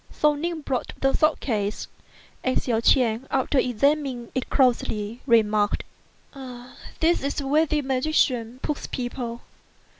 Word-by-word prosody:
So 300 0 +3
Ning 325 +2 -3
brought 265 -4 -3
the 270 0 +2
sword 310 0 +2
case, 210 -4 -2 0.6
and 255 - 0
Hsiao 230 -3 +1
ch'ien, 235 0 +3
after 270 +1 +1
examining 255 0 0
it 260 - -3
closely, 235 -4 +1
remarked, 215 -3 +3 1.2
"This 335 +2 +3
is 280 +2 -2
where 300 +4 +3
the 300 0 0
magician 255 -3 0
puts 300 - -3
people. 245 -1 -4
255 Hz, 125 wpm, -24 LUFS, 235-290 Hz, 1.2 s, So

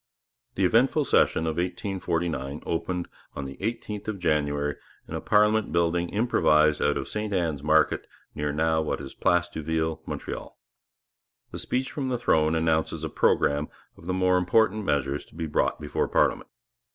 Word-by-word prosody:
The 95 - +2
eventful 130 - +3
session 80 - +3
of 80 0 -2
1849 85 -6 -2
opened 85 +1 -2 0.3
on 70 - -4
the 70 0 -7
eighteenth 105 -1 -4
of 110 -2 -2
January, 75 -4 0 0.3
in - - -8
a - - -3
parliament 105 -2 +3
building 85 +1 +1
improvised 75 -9 +3
out 75 - +2
of 65 - -4
St 105 0 -3
Anne's 85 -7 -1
market 75 +1 +2 0.3
near 75 - -2 0.3
what 80 - -2
is 70 -2 -8
now - - -40
Place 90 0 +3
d'Youville, 80 -1 -2
Montreal. - - -6 0.9
The - - -6
Speech 130 +1 -2
from 135 -3 -3
the 125 - 0
Throne 80 -9 +2
announces 80 -1 0
a - - -2
programme 75 +1 +2 0.3
of 85 - -14
the 90 - 0
more 90 0 +3
important 110 +3 +2
measures 70 -2 0
to - - -21
be 80 -1 -3
brought 75 - 0
before 75 -1 -1
parliament. - - +1
85 Hz, 165 wpm, -26 LUFS, 75-100 Hz, 0.9 s, eventful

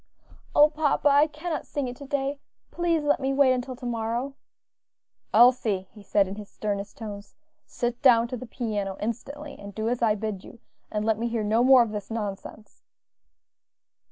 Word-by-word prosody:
"O 295 - +8
papa! 300 -1 +2
I 285 +2 +5
cannot 310 +2 -5
sing 285 -3 -2
it 245 - -6
to 280 - -10
day; 280 0 -2 0.3
please 340 -3 0
let 290 0 +2
me 270 0 -1
wait 275 -2 +5
until 255 0 -3
to 245 - -10
morrow." 235 +3 -2 1.0
"Elsie," 220 -5 +4
he 210 - -14
said 200 0 +2
in 195 +2 -7
his 210 -1 -9
sternest 205 -1 -4
tones, 205 -2 -8 0.3
"sit 240 0 -3
down 240 -4 +5
to 255 - -3
the 250 +1 -8
piano 210 -5 -3
instantly, 280 +7 -5
and 200 -1 -10
do 220 0 -2
as 245 0 -2
I 220 -2 +3
bid 215 -2 -4
you, 240 - -13 0.3
and 210 0 -2
let 220 -1 +1
me 235 - -1
hear 230 -2 -2
no 220 +3 +2
more 260 -1 +7
of 225 - -5
this 210 -2 -6
nonsense." 210 -1 -6
235 Hz, 185 wpm, -26 LUFS, 210-275 Hz, 1.0 s, O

